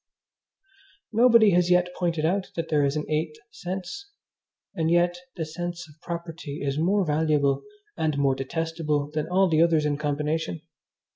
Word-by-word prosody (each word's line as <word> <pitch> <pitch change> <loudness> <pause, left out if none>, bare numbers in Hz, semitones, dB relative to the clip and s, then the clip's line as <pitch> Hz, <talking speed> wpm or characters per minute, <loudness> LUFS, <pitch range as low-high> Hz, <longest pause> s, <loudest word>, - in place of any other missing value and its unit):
Nobody 230 -2 +6
has 175 0 +3
yet 180 0 +3
pointed 165 -3 -1
out 190 +3 0
that 165 -1 -3
there 150 -2 +3
is 140 +1 +1
an 150 - -3
eighth 155 0 -2
sense; 190 - -6 0.6
and 160 -1 0
yet 175 +1 +3 0.2
the 160 - -3
sense 170 +1 -5
of 150 +1 -20
property 165 -3 -6
is 140 +1 -1
more 190 +4 +2
valuable 150 -2 +1 0.3
and 155 -2 -1
more 140 -1 +3
detestable 150 +1 -2
than 155 -1 -2
all 190 +2 +3
the 160 -2 +3
others 165 -3 +3
in 145 -1 0
combination. 150 - -2
160 Hz, 155 wpm, -25 LUFS, 150-175 Hz, 0.6 s, Nobody